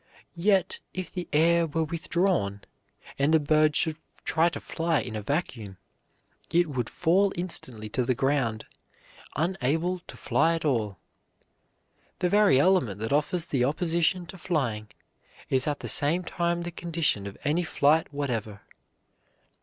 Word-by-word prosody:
Yet 190 +1 +1 0.2
if 185 -1 -5
the 180 -2 -4
air 165 +2 +3
were 160 +2 -1
withdrawn, 165 - -1 0.6
and 140 +2 +3
the 160 - +5
bird 155 0 +3
should 160 -2 +1 0.3
try 165 +2 +2
to 150 -4 -6
fly 165 -2 -1
in 110 -1 -5
a 105 - -3
vacuum, 115 - -3 0.7
it 175 0 +3
would 125 -4 -2
fall 190 +4 +2
instantly 130 -11 -1
to 125 - 0
the 125 +1 0
ground, 135 -4 0 0.7
unable 165 +2 0
to - - -13
fly 165 +1 +2
at 165 - -4
all. 110 -9 0 1.2
The 180 - 0
very 205 -8 +5
element 140 - +2
that 115 +4 -1
offers 150 +4 +1
the 135 -6 0
opposition 170 +5 +1
to 185 +2 -11
flying 120 - -2 0.6
is 130 +1 +1
at 145 -1 -2
the - - -5
same 165 +6 +3
time 170 0 -1
the 175 0 -5
condition 165 - -1
of 100 - -9
any 155 +5 +1
flight 155 -2 +2
whatever. 115 -8 -3
155 Hz, 145 wpm, -27 LUFS, 130-175 Hz, 1.2 s, the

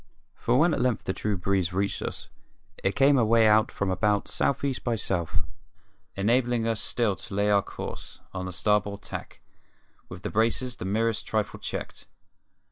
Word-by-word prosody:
When 150 +8 +4
at - - 0
length 125 -3 +1
the 95 - -2
true 105 0 -1
breeze 95 -1 0
reached 100 +2 -1
us - - -5 0.6
it 95 - +1
came 140 0 +5
away 115 0 +4
out 110 +1 +4
from 100 -1 -1
about 105 +1 +1
South 140 0 0
East 135 -2 -1
by 120 -2 0
South, 90 -6 -2 0.7
enabling 120 +3 +2
us 115 -2 0
still 115 -5 +1
to - - -8
lay 100 +1 +2
our 100 -1 +5
course, - - -8
on 95 -1 -4
the - - -4
starboard 100 +2 0
tack, - - -7 0.7
with 90 -1 -9
the - - -3
braces 120 +3 +1
the - - -5
merest 110 +2 0
trifle 105 -2 -1
checked. - - -6
105 Hz, 170 wpm, -27 LUFS, 100-120 Hz, 0.7 s, came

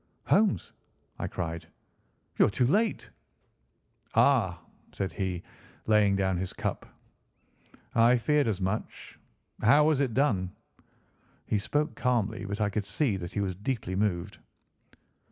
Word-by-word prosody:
"Holmes," 200 - +2 0.5
I - - -2
cried, 85 -2 -5 0.7
"you - - +7
are - - 0
too 120 +5 +1
late." 210 - +1 1.0
"Ah!" - - +3 0.3
said 95 -1 -3
he, 95 -3 -3 0.4
laying 105 -2 +4
down 95 -2 +1
his 90 +1 -3
cup, - - -4 1.1
"I 115 +2 +5
feared 150 +3 +2
as 105 -4 -1
much. 95 +3 -4 0.4
How 140 +7 +6
was 155 -3 +3
it 130 -5 0
done?" 100 -10 +1 0.9
He 105 - 0
spoke 150 +9 -1
calmly, 110 -4 0
but 100 +1 -4
I 105 - +2
could 100 -1 -2
see 135 -10 0
that 85 -2 -7
he 105 - -1
was 95 -2 -1
deeply 105 -1 -3
moved. 95 -3 -1
105 Hz, 135 wpm, -28 LUFS, 95-125 Hz, 1.1 s, you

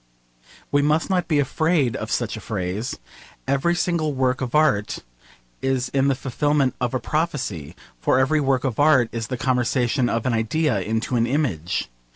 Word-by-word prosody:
We 145 +1 +3
must 155 +5 +1
not 180 -2 +1
be 155 - +2
afraid 145 -1 +1
of - - -4
such - - -1
a - - -8
phrase. 95 +7 -3 0.5
Every 140 +6 +2
single 170 -4 0
work 130 0 0
of 130 +1 -3
art 130 -10 +2 0.6
is 130 -2 -1
the 135 0 +2
fulfilment 140 +1 0
of 125 +1 0
a - - +1
prophecy: 135 - -2 0.2
for 130 - +2
every 135 +4 +3
work 135 -2 +1
of 130 -5 -2
art 140 -6 +5
is 115 -1 -4
the 125 - -3
conversion 125 0 +1
of 115 +1 -1
an 130 - +1
idea 115 +2 +1
into 110 +5 -1
an 115 0 +2
image. 105 - -1
130 Hz, 170 wpm, -23 LUFS, 120-150 Hz, 0.6 s, art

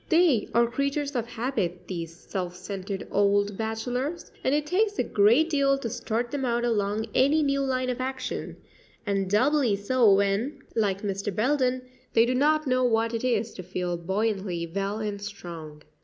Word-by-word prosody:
They 325 - +4
are 235 0 +5
creatures 280 +3 -2
of 235 -2 -1
habit 225 -7 -2
these 170 -3 -4
self 180 +1 -5
centred 195 0 -5
old 205 0 +2
bachelors, 245 - -3
and 265 - +2
it 295 0 0
takes 405 +6 +1
a - - +2
great 230 +10 +4
deal 275 -2 +3
to 235 -5 -4
start 235 0 -2
them 285 -2 -2
out 240 -1 0
along 215 -1 0
any 295 +4 +4
new 275 -1 +1
line 255 -1 0
of 250 +1 -4
action, 260 0 -4 0.5
and 195 -2 0
doubly 250 +2 +3
so 220 +2 +3
when, 200 +8 +1
like 200 -3 0
Mr. 200 0 -2
Belden, 255 +4 +1 0.3
they 230 - +5
do 250 - 0
not 305 +4 +3
know 255 -1 +2
what 230 -1 +2
it 230 - -2
is 230 -3 0
to - - -7
feel 180 -1 -3
buoyantly 190 -1 -1
well 195 +4 -3
and 210 -2 -4
strong. 165 -7 -8
225 Hz, 170 wpm, -27 LUFS, 200-260 Hz, 0.5 s, are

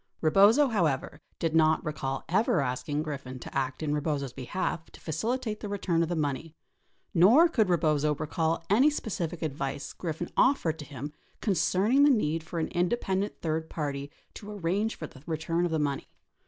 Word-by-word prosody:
Rebozo, 205 - +5
however, 155 - 0 0.2
did 165 -2 -1
not 160 0 +4
recall 135 -3 -3
ever 190 +2 +2
asking 145 +3 -1
Griffin 140 -4 -6
to - - -10
act 130 +2 -1
in 150 -1 0
Rebozo's 145 -3 -1
behalf 160 +5 -3
to - - -13
facilitate 220 - -2
the 210 - -6
return 185 -4 0
of 165 - 0
the 175 - -1
money, 155 +1 -2 0.6
nor 225 - +7
could 220 - +1
Rebozo 155 -3 +2
recall 160 +2 -1
any 245 +9 +5
specific 175 - -3
advice 140 -2 -3
Griffin 170 0 -4
offered 170 - +2
to 150 - -7
him 145 +1 -7 0.3
concerning 205 - +2
the 290 - +7
need 165 - +2
for 165 +2 -7
an 160 - -1
independent 190 +2 -1
third 160 0 -2
party 140 -2 -3 0.2
to 205 - -9
arrange 205 +3 -1
for 155 - -6
the 135 - -13
return 165 +2 0
of 175 - -2
the 160 - +1
money. 145 -2 -1
160 Hz, 170 wpm, -28 LUFS, 150-195 Hz, 0.6 s, nor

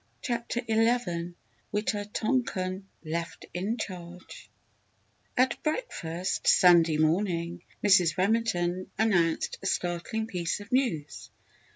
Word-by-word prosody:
CHAPTER 240 -1 -2
ELEVEN 220 -7 +1 0.4
WITA 210 0 -1
TONKAN 195 -6 -1 0.2
LEFT 170 +2 -4
IN 200 +7 -2
CHARGE 180 -4 -8 0.9
At 255 -1 +2
breakfast, 185 - -2
Sunday 170 -3 +6
morning, 170 +1 0 0.2
Mrs. 185 -4 +5
Remington 185 -3 +1
announced 175 -7 +1
a 195 - -3
startling 175 +5 -1
piece 180 -4 -2
of 205 +2 -11
news. 190 - -1
185 Hz, 95 wpm, -28 LUFS, 170-220 Hz, 0.9 s, Sunday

